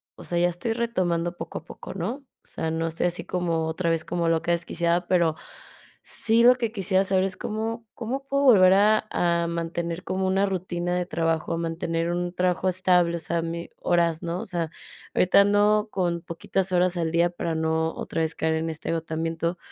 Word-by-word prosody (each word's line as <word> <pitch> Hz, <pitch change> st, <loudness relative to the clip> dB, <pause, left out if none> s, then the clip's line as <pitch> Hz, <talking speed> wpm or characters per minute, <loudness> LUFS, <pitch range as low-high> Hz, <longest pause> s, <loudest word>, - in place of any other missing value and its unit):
o -, -, -12 dB
sea, 175 Hz, -, -2 dB
ya 175 Hz, -, +4 dB
estoy 200 Hz, +7 st, -3 dB
retomando 180 Hz, -7 st, -1 dB
poco 165 Hz, -, -6 dB
a -, -, -21 dB
poco, -, -, -9 dB
¿no? 225 Hz, +10 st, -4 dB, 0.2 s
O -, -, -21 dB
sea, 160 Hz, -, -3 dB
no 165 Hz, 0 st, -1 dB
estoy 165 Hz, +2 st, 0 dB
así 175 Hz, 0 st, -3 dB
como 165 Hz, -3 st, -1 dB
otra 165 Hz, +1 st, -1 dB
vez 165 Hz, -1 st, 0 dB
como 170 Hz, -1 st, 0 dB
loca 165 Hz, +1 st, +1 dB
desquiciada, 170 Hz, 0 st, 0 dB
pero 170 Hz, -4 st, +2 dB, 0.7 s
sí 230 Hz, +1 st, +2 dB
lo 250 Hz, +1 st, +8 dB
que 230 Hz, -3 st, -2 dB
quisiera 195 Hz, -3 st, +1 dB
saber 190 Hz, -1 st, +2 dB
es 190 Hz, -1 st, -3 dB
cómo, 225 Hz, +2 st, -4 dB
cómo 265 Hz, +4 st, -4 dB
puedo 275 Hz, +1 st, +1 dB
volver 190 Hz, -7 st, +7 dB
a 215 Hz, +2 st, +4 dB
a 170 Hz, -1 st, +1 dB
mantener 170 Hz, +1 st, -3 dB
como 190 Hz, 0 st, -2 dB
una 195 Hz, +1 st, +2 dB
rutina 175 Hz, -1 st, -2 dB
de 180 Hz, 0 st, 0 dB
trabajo, 165 Hz, -2 st, -1 dB
a -, -, -1 dB
mantener 165 Hz, 0 st, -2 dB
un 175 Hz, 0 st, -2 dB
trabajo 180 Hz, +1 st, +1 dB
estable, 180 Hz, -2 st, +2 dB
o -, -, -6 dB
sea, 165 Hz, +1 st, -1 dB
mi 170 Hz, +1 st, -5 dB
horas, 170 Hz, -1 st, +1 dB
¿no? 170 Hz, +1 st, -2 dB
O -, -, -6 dB
sea, 170 Hz, -4 st, -3 dB, 0.4 s
ahorita 185 Hz, +2 st, +5 dB
ando 210 Hz, +1 st, +3 dB
con 175 Hz, -3 st, -1 dB
poquitas 180 Hz, +3 st, -2 dB
horas 180 Hz, 0 st, +2 dB
al 165 Hz, -1 st, -1 dB
día 170 Hz, +1 st, +3 dB
para 170 Hz, -2 st, -3 dB
no 160 Hz, 0 st, 0 dB
otra 165 Hz, -, -3 dB
vez 160 Hz, 0 st, -1 dB
caer 160 Hz, 0 st, 0 dB
en 160 Hz, +1 st, -1 dB
este 160 Hz, 0 st, -5 dB
agotamiento, 165 Hz, +1 st, -2 dB
175 Hz, 200 wpm, -25 LUFS, 165-190 Hz, 0.7 s, lo